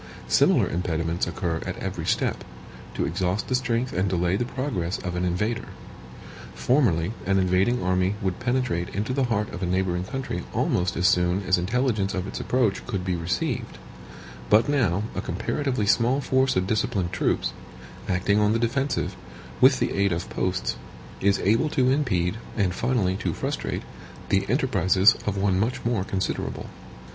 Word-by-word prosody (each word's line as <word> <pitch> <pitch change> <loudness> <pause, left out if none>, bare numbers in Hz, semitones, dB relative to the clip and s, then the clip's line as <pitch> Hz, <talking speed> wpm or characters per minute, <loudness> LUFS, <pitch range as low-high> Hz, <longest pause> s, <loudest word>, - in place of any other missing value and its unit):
Similar - - +4
impediments 85 -1 -1
occur 85 -1 -2
at - - -5
every - - -4
step, - - 0 0.5
to - - 0
exhaust 95 +3 -1
the - - 0
strength 125 -1 0
and 95 +2 +1
delay 90 0 +1
the 120 - 0
progress 120 -9 -2
of 90 -1 -5
an 90 - -1
invader. 105 +6 -1 0.9
Formerly, 110 - +2 0.2
an 95 0 +3
invading 95 +5 +2
army 95 +2 +1
would 95 -4 -2
penetrate 120 -8 0
into 105 +6 -1
the 135 -1 +1
heart 105 -3 -1
of - - -6
a 90 - -1
neighboring 90 -1 0
country 115 -5 -4
almost 90 -1 +1
as 90 +2 +3
soon 90 +2 +2
as 95 -1 +2
intelligence 105 0 0
of 95 0 -2
its 100 - -5
approach 120 -6 +1
could 100 -6 -3
be 90 -2 0
received; 85 +1 -2 0.7
but 110 +5 +5
now 110 -10 +1
a - - -3
comparatively 135 -7 -1
small 120 +6 +3
force 130 -1 +2
of 95 0 +1
disciplined 100 -3 0
troops, - - 0 0.6
acting 95 +3 +2
on 105 0 +3
the - - +2
defensive, 120 -5 -1 0.5
with - - +7
the - - 0
aid 100 -1 +2
of 85 +1 -3
posts, 90 -8 -1 0.4
is 100 +1 +3
able 115 +10 +2
to 130 -3 +2
impede, 105 - +1 0.2
and 95 -4 +1
finally 105 -5 0
to - - -2
frustrate, - - -3 0.5
the 95 0 +1
enterprises 100 - +4
of 100 -1 0
one 95 -1 +2
much 115 +5 -1
more 115 -5 +1
considerable. 95 -1 -3
95 Hz, 165 wpm, -25 LUFS, 90-120 Hz, 0.9 s, with